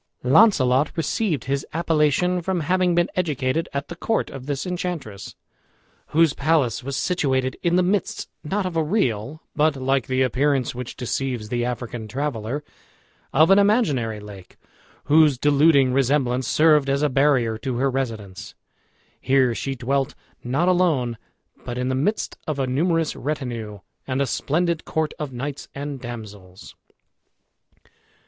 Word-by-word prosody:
Launcelot 135 - +4
received 165 0 -1
his 135 0 -1
appellation 165 +2 +2
from 180 0 -1
having 180 +2 +1
been 175 0 +3
educated 155 -3 -1
at 140 +1 -3
the 170 - -7
court 225 +6 -1
of 135 -1 -9
this 140 +1 -2
enchantress, 175 - -5 0.7
whose 160 -2 +3
palace 140 -6 +1
was 140 +1 -3
situated 130 -7 0
in 170 0 +1
the 180 - +4
midst, 190 +1 -1 0.2
not 195 +6 -1
of 180 -2 -4
a 165 - +2
real, 150 - -1
but, 150 0 +2
like 135 -1 0
the 130 0 +1
appearance 135 0 +1
which 125 0 -7
deceives 125 -3 -3
the 120 0 -1
African 120 -2 -4
traveller, 130 +1 -3 0.7
of 155 +7 +5
an 195 - +7
imaginary 150 - +2
lake, 100 -3 -12 0.5
whose 150 -2 +4
deluding 140 -1 +4
resemblance 130 -2 +1
served 150 -2 +4
as 140 +2 +1
a - - +4
barrier 130 -4 +2
to 130 -2 -3
her 135 +2 +1
residence. 110 -8 -5 0.6
Here 130 -2 +2
she 135 +3 -3
dwelt 135 +3 -1 0.3
not 135 +8 0
alone, 165 -10 +2 0.5
but 120 -1 -5
in 125 +1 -1
the - - 0
midst 155 +12 -1
of 155 -3 -2
a 135 - 0
numerous 165 +5 0
retinue, 120 -9 -4 0.3
and 130 0 -1
a 140 - +2
splendid 165 +5 -1
court 160 -1 -2
of 150 -3 -4
knights 135 +3 -5
and 140 0 -5
damsels. 105 -6 -9
140 Hz, 145 wpm, -23 LUFS, 125-160 Hz, 0.7 s, an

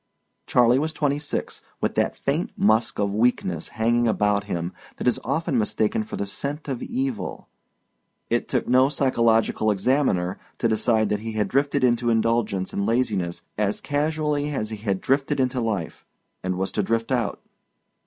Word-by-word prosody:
Charley 125 +1 +4
was 155 +2 -1
twenty 145 -2 0
six, 150 - -4 0.2
with - - 0
that - - 0
faint - - -1
musk 110 +2 +2
of 100 -1 0
weakness 105 -7 +1
hanging 120 +2 +1
about 105 -2 +1
him 85 -3 -3 0.2
that - - -3
is 125 - +3
often 140 0 0
mistaken 110 0 0
for 110 - -7
the 100 - -2
scent 140 +10 -4
of 135 -4 -3
evil. 130 -4 -3 0.8
It - - 0
took - - -1
no 130 +2 +5
psychological 115 -6 +2
examiner 100 -4 +1 0.2
to 115 - +1
decide 110 -1 +2
that 105 - 0
he 110 +1 -5
had 105 -1 0
drifted 140 0 +1
into 120 -1 +3
indulgence 115 -4 +1
and 100 0 -1
laziness 105 -8 0 0.2
as 105 -1 +1
casually 150 0 0
as 110 -7 -3
he 110 - -4
had 100 -3 -2
drifted 140 +2 +1
into 130 -1 +1
life, 105 -8 -3 0.4
and 95 0 -2
was 95 +1 -1
to 105 - 0
drift 115 +4 -1
out. 120 -5 0
115 Hz, 165 wpm, -24 LUFS, 105-135 Hz, 0.8 s, no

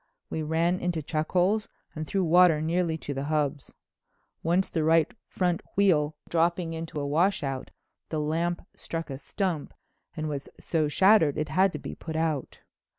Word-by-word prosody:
We 160 - -2
ran 165 +4 +1
into 170 -3 -1
chuck 155 +1 -2
holes 195 +4 +2 0.2
and 155 0 -5
through 195 -1 0
water 175 -1 +6
nearly 165 +1 0
to 145 - -5
the 135 +1 -3
hubs. 150 -2 -1 0.7
Once 175 +3 +1
the 160 - 0
right 160 0 +3
front 180 -2 0 0.2
wheel 155 -7 +3
dropping 170 0 +1
into 160 -2 -5
a 145 - -2
washout, 145 -3 0 0.4
the 155 - -1
lamp 165 +4 -1
struck 165 -3 -5
a 135 - -5
stump 175 -1 -3 0.4
and 155 0 -2
was 140 -2 -4
so 155 -3 0
shattered 175 -2 +4
it 155 0 -1
had 185 +5 +3
to - - -3
be - - -7
put 160 - -7
out. 160 -4 -2
160 Hz, 165 wpm, -27 LUFS, 150-175 Hz, 0.7 s, water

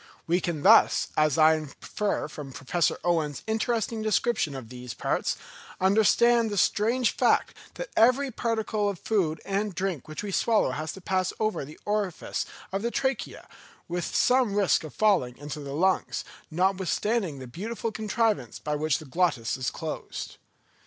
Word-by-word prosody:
We 175 +2 +1
can 160 -4 -3
thus, - - +6
as 155 -1 +3
I 160 0 +7
infer 155 +7 -3
from 145 -3 -9
Professor 160 +7 0
Owen's 160 -6 0
interesting 225 0 -1
description 215 -7 +1
of 125 -4 -8
these 125 -1 -8
parts, - - -1 0.4
understand 220 +4 +4
the 205 - -3
strange 230 +7 +2
fact - - +2 0.2
that - - -6
every 255 +4 +4
particle 220 -3 -1
of 200 - -4
food 170 -6 0
and 200 0 -1
drink 180 -7 -2
which 155 +5 -6
we 205 - -4
swallow 220 - +2
has 155 +4 -4
to 190 - -11
pass 185 0 0
over 215 -7 0
the 150 +3 -11
orifice 205 -4 -2 0.2
of 195 +1 -2
the 235 - 0
trachea, 265 +1 -2 0.4
with 175 -1 -2
some 250 -5 +2
risk 200 -5 +3
of 155 - -9
falling 190 - +2
into 145 +1 -6
the 140 -1 -6
lungs, 185 +4 +1 0.3
notwithstanding 190 +1 0
the 130 - -8
beautiful 220 - -4
contrivance 215 - -1
by 150 - -3
which 155 -1 +1
the 155 - -10
glottis 140 -6 0
is 130 -1 -2
closed. 160 -1 -6
190 Hz, 160 wpm, -27 LUFS, 155-220 Hz, 0.4 s, I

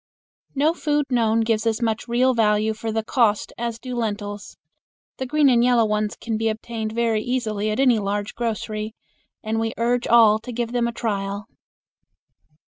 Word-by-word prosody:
No 300 +4 +3
food 295 -3 0
known 230 -2 +2
gives 225 0 0
as 225 0 +1
much 225 -1 -1
real 250 +2 +3
value 215 -1 +2
for 220 +1 -4
the 220 0 -1
cost 220 -3 +1
as 235 -1 -3
do 250 +1 -7
lentils. 205 -3 -4 0.6
The 260 - -4
green 300 +2 +3
and 240 -3 +4
yellow 245 -2 +4
ones 210 0 -1
can 225 -2 -3
be 225 0 +1
obtained 220 0 -4
very 230 -2 +1
easily 215 -3 -1
at 215 - -2
any 250 -4 +4
large 205 +1 -2
grocery, 220 -2 -3 0.5
and 220 0 -1
we 225 0 -2
urge 240 +1 0
all 225 -2 +6
to 230 +3 -8
give 235 0 -3
them 240 -1 +1
a - - -2
trial. 200 -3 -3
225 Hz, 175 wpm, -23 LUFS, 215-240 Hz, 0.6 s, all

